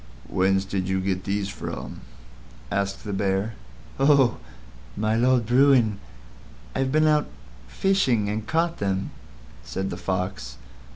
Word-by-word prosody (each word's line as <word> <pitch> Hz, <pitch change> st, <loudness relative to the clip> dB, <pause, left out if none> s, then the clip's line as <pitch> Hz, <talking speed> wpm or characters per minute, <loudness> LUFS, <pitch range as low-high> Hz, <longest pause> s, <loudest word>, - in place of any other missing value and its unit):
"Whence 95 Hz, +1 st, +2 dB
did 95 Hz, -1 st, -2 dB
you 95 Hz, 0 st, +1 dB
get 95 Hz, 0 st, -2 dB
these 100 Hz, 0 st, -1 dB
from?" -, -, -6 dB, 0.7 s
asked 100 Hz, 0 st, -1 dB
the 105 Hz, -, -4 dB
Bear. 95 Hz, +2 st, 0 dB, 0.5 s
"Oh! 135 Hz, -4 st, +4 dB, 0.6 s
My 110 Hz, +1 st, +1 dB
Lord 125 Hz, 0 st, +3 dB
Bruin, 125 Hz, -3 st, +4 dB, 0.7 s
I've 130 Hz, 0 st, 0 dB
been 155 Hz, +2 st, +3 dB
out 150 Hz, -1 st, +3 dB, 0.4 s
fishing 130 Hz, -, +1 dB
and 105 Hz, +1 st, -3 dB
caught 165 Hz, +1 st, 0 dB
them," 95 Hz, -1 st, -1 dB, 0.5 s
said 95 Hz, +10 st, -4 dB
the 85 Hz, -, -4 dB
Fox. 90 Hz, -10 st, -3 dB
105 Hz, 125 wpm, -25 LUFS, 95-130 Hz, 0.7 s, Oh